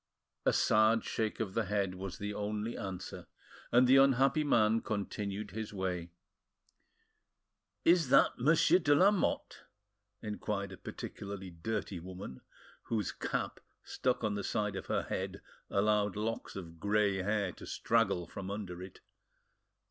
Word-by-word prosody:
A - - +6
sad 110 +1 +4
shake 110 -2 -2
of 105 -4 -2
the 115 0 0
head 100 -1 0
was 95 0 -6
the 105 0 -4
only 105 +2 -3
answer, 95 -3 -6 0.4
and 125 +1 +6
the 130 +2 +6
unhappy 135 +2 +4
man 115 -5 +3
continued 105 -2 -3
his 110 -1 -5
way. 90 -3 -2 1.8
"Is 170 -5 +5
that - - +5
Monsieur 155 +6 +5
de 145 -4 +4
Lamotte?" 195 +4 +2 0.6
inquired 105 -2 -3
a 95 - -9
particularly 100 -2 -7
dirty 95 +2 -3
woman, 90 -6 -8 0.4
whose 110 -5 -1
cap, - - -3 0.2
stuck 125 -2 -1
on 105 -1 +1
the 100 -1 -3
side 105 -1 -1
of - - -5
her, - - 0
head, - - -4 0.3
allowed 105 -1 +2
locks 110 +2 -3
of 85 -4 -8
grey 100 0 +2
hair 100 0 0
to - - -11
straggle 105 -6 +1
from 95 +2 -7
under 95 -3 -5
it. 95 0 -10
105 Hz, 140 wpm, -33 LUFS, 95-115 Hz, 1.8 s, A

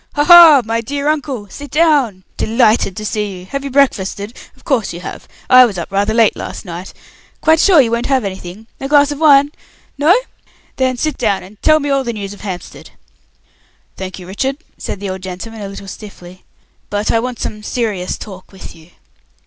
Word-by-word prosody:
"Ha, 290 - +2
ha! 335 -4 +9
My 230 +1 -1
dear 280 +5 -4
uncle, 280 -8 -2
sit 285 +8 -10
down. 280 - +2
Delighted 220 -4 +1
to 215 - -5
see 210 -3 -3
you. 180 - -11
Have 275 +7 -5
you 280 - -4
breakfasted? 225 -5 0 0.2
of - - -23
course 255 - -1
you 170 - -8
have. - - -8 0.2
I 255 0 +8
was 215 -6 0
up 170 - -6
rather 200 +2 +1
late 225 -1 +3
last - - -7
night. 175 +1 -7 0.5
Quite 320 0 +3
sure 360 -2 +5
you 240 -4 +3
won't 235 +1 -1
have 265 -3 +1
anything. 190 +1 -7
A 270 - -4
glass 290 0 +4
of 290 - -5
wine? 285 -2 +5 0.5
No 325 +8 +5 0.6
then 260 -1 0
sit 310 +4 -2
down 195 -3 0
and 200 +3 -16
tell 310 0 +4
me 290 -1 -2
all 275 -1 +1
the 235 -2 -3
news 200 -2 -6
of 205 - -14
Hampstead." 185 -3 -8 1.1
"Thank 190 0 -7
you, 180 - -10
Richard," 265 +9 -3 0.2
said - - -6
the 200 -1 -5
old 190 0 -6
gentleman, 190 +4 -7
a 200 - -5
little 195 0 -9
stiffly, 185 -3 -11 0.4
"but 205 +1 -1
I 230 - +2
want 250 +1 -4
some 210 - -5
serious 210 -5 -3
talk 190 -3 -11
with 190 - -11
you. 165 0 -18
225 Hz, 200 wpm, -16 LUFS, 195-275 Hz, 1.1 s, ha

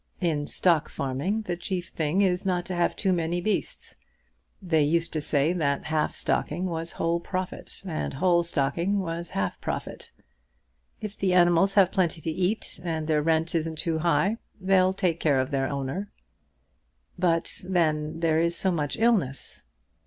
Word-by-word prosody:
In 155 -5 0
stock 170 -5 +2
farming 140 +12 -2
the 175 -4 -2
chief 175 +1 -4
thing 160 +5 +1
is 180 -1 +1
not 180 -2 0
to 185 - -4
have 175 0 +1
too 190 - +1
many 170 0 0
beasts. 210 +4 -3 0.6
They 170 -5 +1
used 165 +3 +1
to 155 - -1
say 150 +2 +2
that 140 -5 0
half 155 0 0
stocking 175 +5 -1
was 165 -2 -3
whole 170 +1 0
profit, 185 +2 -5
and 160 -6 -3
whole 175 +3 +3
stocking 170 +4 0
was 170 -2 -3
half 95 -1 -2
profit. - - -5 0.9
If 210 -1 -5
the 185 -2 +2
animals 175 +2 +4
have 195 -3 +5
plenty 175 -3 +1
to 160 +1 -3
eat, 185 +6 -1
and 160 -3 -2
the 155 -1 +2
rent 160 +1 +1
isn't 160 -1 -1
too 160 0 -1
high, 185 +6 +2 0.2
they'll 185 -1 +3
take 175 -3 0
care 145 -4 +2
of 130 +3 -1
their 135 -1 0
owner." 140 +9 -3 1.1
"But 170 -2 +1
then 160 -3 0
there 160 -1 +3
is 170 0 +1
so 190 - +2
much 150 -4 -2
illness." 210 - 0
170 Hz, 165 wpm, -26 LUFS, 155-185 Hz, 1.1 s, have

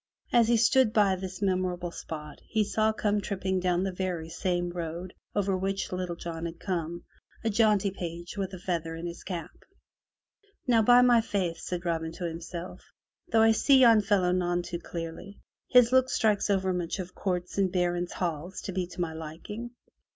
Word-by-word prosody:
As 235 -2 +5
he 235 0 +4
stood 235 0 +4
by 205 -4 +4
this 190 +1 -6
memorable 180 -2 0
spot, 150 -3 -8
he 220 -1 +1
saw 215 +1 +1
come 210 -1 0
tripping 190 -2 -1
down 180 0 +1
the 195 - -1
very 180 -3 -3
same 175 +1 -1
road 175 +1 -5 0.2
over 200 -2 +1
which 195 +1 -2
Little 180 -1 -3
John 165 -1 -5
had 165 0 -9
come, 170 -3 -3 0.4
a 225 - +1
jaunty 210 -2 +3
page 175 -1 -6
with 195 -2 -3
a 185 - -7
feather 165 -2 -3
in 165 +1 -6
his 170 0 -6
cap. 175 -4 -5 1.1
"Now, 235 -3 +4
by 245 +3 +7
my 240 -2 +6
faith,'' 185 -6 -2
said 180 0 -4
Robin 165 -1 -1
to 175 - -5
himself, 170 +2 -7 0.5
"though 225 -1 +4
I 225 - +6
see 270 +5 +5
yon 230 -3 +7
fellow 195 -3 +2
none 175 -1 0
too 175 0 -5
clearly, 170 +4 -7 0.3
his 250 -1 +6
look 260 0 +4
speaks 210 -3 +2
overmuch 185 -3 0
of 185 -1 -6
courts 180 0 -2
and 190 -2 +2
baron's 175 -1 0
halls 175 +1 -3
to 195 - -5
be 185 -1 -2
to 180 - -6
my 165 -2 -2
liking. 165 +9 -7
185 Hz, 180 wpm, -28 LUFS, 175-205 Hz, 1.1 s, by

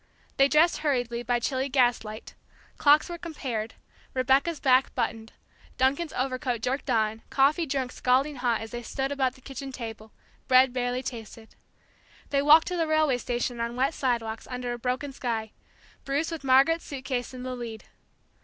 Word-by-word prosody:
They 275 - +6
dressed 310 +4 +4
hurriedly, 245 -5 -1
by 240 0 0
chilly 265 +3 -1
gas 250 -3 +3
light; 215 +1 -9 0.5
clocks 295 +1 +5
were 345 -1 -6
compared, 250 -10 -4 0.4
Rebecca's 270 +5 +2
back 260 -1 +3
buttoned; 225 -2 -3 0.4
Duncan's 280 +5 +1
overcoat 255 -2 -2
jerked 265 +2 -2
on; 220 -2 +1
coffee 295 +5 +2
drunk 265 -2 -2
scalding 270 +3 +1
hot 240 -3 0
as 225 - -7
they 240 - -5
stood 270 +3 -3
about 265 -2 0
the 260 - -18
kitchen 270 +1 -7
table; 225 -3 -8 0.4
bread 255 0 +5
barely 250 0 -1
tasted. 225 -2 -8 0.8
They 280 -1 +2
walked 305 +3 +7
to 360 - -2
the 330 -1 +1
railway 310 -5 +2
station 240 0 -2
on 235 +1 -2
wet 265 +5 +1
sidewalks, 230 -5 -2
under 250 -1 -3
a 240 - -6
broken 255 +3 -2
sky, 225 -4 -3 0.5
Bruce, 285 +4 -1
with 325 -3 -5
Margaret's 275 +5 +4
suit 270 -2 -7
case, 245 -3 -2
in 255 -1 -8
the 255 0 -4
lead. 230 -3 -7
255 Hz, 170 wpm, -27 LUFS, 240-280 Hz, 0.8 s, walked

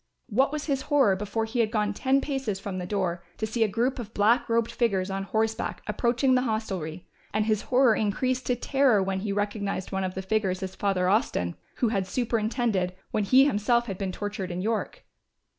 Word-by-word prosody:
What 260 +6 +2
was 300 -1 -3
his 275 -3 0
horror, 275 -10 +4
before 210 +3 -2
he 225 +2 -3
had 225 -2 +3
gone 210 -2 0
ten 270 +5 +2
paces 270 -9 -2
from 195 -2 -5
the 180 - -5
door, 180 -4 -1
to 220 - -1
see 225 +1 0
a - - +3
group 235 +6 0
of 225 -2 -8
black 230 +5 +3
robed 230 0 +1
figures 195 -5 0
on 195 0 -3
horseback 220 +2 -1
approaching 240 +4 +1
the 255 - +4
hostelry, 190 -8 -3 0.3
and 215 0 +2
his 215 -1 +1
horror 250 -2 +5
increased 250 +5 -1
to 250 - +2
terror 255 -5 +3
when 190 0 -1
he 200 +1 -3
recognised 205 -2 -2
one 190 0 -1
of 185 0 -3
the 190 - -4
figures 190 -2 0
as 190 0 -4
Father 190 -3 0
Austin, 185 - +1 0.2
who 240 - +1
had 195 -4 -1
superintended, 220 -4 0 0.2
when 210 - 0
he 260 +6 +6
himself 235 -1 +2
had 195 -5 -5
been 195 -2 -2
tortured 205 -1 -4
in 175 0 -4
York. 220 0 -2
215 Hz, 205 wpm, -27 LUFS, 195-240 Hz, 0.3 s, he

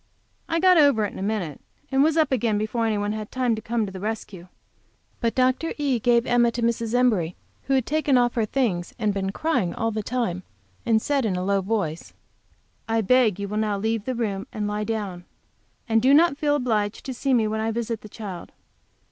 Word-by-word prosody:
I 330 0 +1
got 365 -1 +6
over 280 -8 +4
it 205 - -5
in - - -8
a - - -5
minute, 195 -7 -3 0.3
and 270 0 +3
was 315 +1 +2
up 310 -3 +3
again 230 -4 +1
before 225 +2 -1
any 215 -1 0
one 205 0 -1
had 215 -1 -5
time 255 -2 +1
to 220 - -3
come 225 0 -1
to 195 - -7
the 190 - -8
rescue. 205 -3 -5 0.7
But 230 -1 -1
Dr. 260 +5 +1
E. 280 -5 0
gave 235 +1 +3
Emma 240 -1 +3
to 240 - -3
Mrs. 230 0 0
Embury, 215 -10 +2 0.3
who 270 - +1
had 260 -3 +1
taken 300 -3 +2
off 245 -1 +2
her 225 -3 0
things 205 -9 -1
and 215 -4 0
been 195 -1 -2
crying 245 - -1
all 225 0 -1
the 215 0 -2
time, 210 -6 -2 0.5
and 225 -1 +4
said 280 +3 0
in 205 -5 0
a 180 - -2
low 200 +1 +1
voice, 185 -6 -3 0.8
"I 225 0 +2
beg 225 -2 +3
you 200 - -3
will 210 +2 -4
now 215 -2 0
leave 220 +1 -1
the 255 - -2
room, 205 -4 -2
and 210 -1 -3
lie 210 0 -2
down. 200 -6 -4 0.6
And 225 -1 +3
do 265 +4 +5
not 325 -1 +5
feel 290 0 +1
obliged 220 -6 -1
to 265 - -4
see 265 +1 +1
me 225 -3 +2
when 220 +1 -2
I 220 +1 0
visit 230 0 -3
the 215 - -11
child. 195 -5 -8
225 Hz, 225 wpm, -24 LUFS, 205-255 Hz, 0.8 s, got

